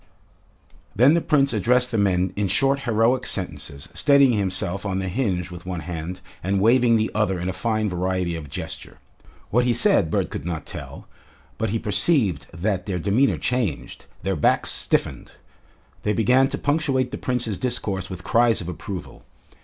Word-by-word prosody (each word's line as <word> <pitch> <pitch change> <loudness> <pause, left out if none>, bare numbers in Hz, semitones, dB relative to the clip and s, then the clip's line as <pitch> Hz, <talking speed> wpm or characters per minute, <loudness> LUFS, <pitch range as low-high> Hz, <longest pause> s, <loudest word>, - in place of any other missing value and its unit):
Then 130 +8 +6
the 170 - +2
Prince 140 -4 +2
addressed 125 +4 +2
the 115 - 0
men 95 -2 +1
in 100 -1 0
short, 135 +8 +1
heroic 120 +2 +2
sentences, 75 -6 -4
steadying 140 -2 +5
himself 95 -2 0
on 100 -2 -2
the 95 0 -2
hinge 90 -5 -1
with 90 +1 -10
one 90 -2 -3
hand 85 +2 -6 0.2
and 95 +2 0
waving 115 +3 +4
the 110 0 +1
other 100 -4 0
in 90 - -3
a 95 - -1
fine 110 +2 -1
variety 90 -1 -1
of 75 -3 -7
gesture. - - -7 0.5
What 120 +3 +3
he 120 -1 +2
said 110 -8 +3
Bert - - -1
could - - -5
not 80 -2 -4
tell, - - -9 0.5
but 110 - 0
he 115 - 0
perceived 105 - +1
that 95 +2 -2
their 95 -3 -1
demeanor 105 +10 +2
changed, 120 - -2 0.2
their 95 0 0
backs 75 - +2
stiffened. - - -1 0.7
They 105 - 0
began 125 +5 +4
to - - -3
punctuate 140 -4 0
the - - -5
Prince's 120 -5 -2
discourse 100 -7 -2
with 90 -2 -7
cries 115 +4 +3
of 85 - -6
approval. 90 0 -7
100 Hz, 170 wpm, -23 LUFS, 90-125 Hz, 0.7 s, Then